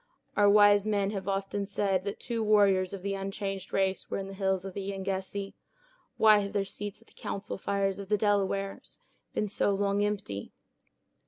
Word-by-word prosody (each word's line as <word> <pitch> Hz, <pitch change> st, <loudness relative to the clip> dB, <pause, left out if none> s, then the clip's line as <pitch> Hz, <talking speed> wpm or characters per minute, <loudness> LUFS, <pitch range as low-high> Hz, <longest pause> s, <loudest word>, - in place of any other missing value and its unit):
"Our 205 Hz, -1 st, +5 dB
wise 205 Hz, 0 st, +6 dB
men 200 Hz, -2 st, +1 dB
have 195 Hz, -2 st, -5 dB
often 195 Hz, 0 st, -2 dB
said 195 Hz, -2 st, 0 dB
that 200 Hz, -, -4 dB
two 230 Hz, -2 st, -2 dB
warriors 200 Hz, -3 st, +4 dB
of 195 Hz, -2 st, -7 dB
the 200 Hz, 0 st, -1 dB
unchanged 195 Hz, 0 st, -4 dB
race 190 Hz, -1 st, 0 dB
were -, -, -2 dB
in 195 Hz, 0 st, -4 dB
the -, -, -7 dB
hills 190 Hz, -1 st, 0 dB
of 195 Hz, -, -6 dB
the 200 Hz, -, -4 dB
Yengeese; 195 Hz, 0 st, -3 dB, 0.6 s
why 215 Hz, -1 st, +7 dB
have 200 Hz, -1 st, -3 dB
their 200 Hz, -1 st, +1 dB
seats 205 Hz, +2 st, -7 dB
at -, -, -35 dB
the -, -, -21 dB
council 200 Hz, -, -5 dB
fires 195 Hz, 0 st, 0 dB
of 200 Hz, -1 st, -7 dB
the 210 Hz, -, +3 dB
Delawares 200 Hz, -1 st, -1 dB, 0.4 s
been 210 Hz, -, 0 dB
so 205 Hz, -, +1 dB
long 200 Hz, +1 st, +1 dB
empty?" 195 Hz, -, -3 dB
200 Hz, 185 wpm, -29 LUFS, 195-205 Hz, 0.6 s, why